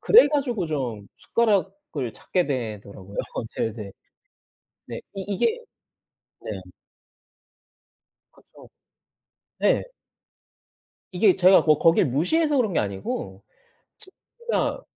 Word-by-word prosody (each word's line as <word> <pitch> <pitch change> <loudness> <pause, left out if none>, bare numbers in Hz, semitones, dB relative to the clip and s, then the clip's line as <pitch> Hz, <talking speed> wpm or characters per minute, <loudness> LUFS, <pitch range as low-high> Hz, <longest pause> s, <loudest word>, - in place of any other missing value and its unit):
그래 465 +3 +7
가지고 250 - -1
좀 125 -9 -3
숟가락을 195 - -1
찾게 180 -2 -1
되더라고요. 105 -6 -5 0.4
네네. 105 -3 -3 1.0
네. - - -6
이 195 - -4
이게 440 - +1 0.8
네. - - -6 1.8
그쵸. - - -18 0.9
네. - - +3 1.3
이게 185 +1 +4
제가 190 0 +6
뭐 155 -2 +4
거길 165 -1 +4
무시해서 285 - +1
그런 225 -6 +1
게 - - +1
아니고 95 -1 -4 0.6
진짜 470 +5 -4
175 Hz, 185 characters per minute, -24 LUFS, -, 1.8 s, 그래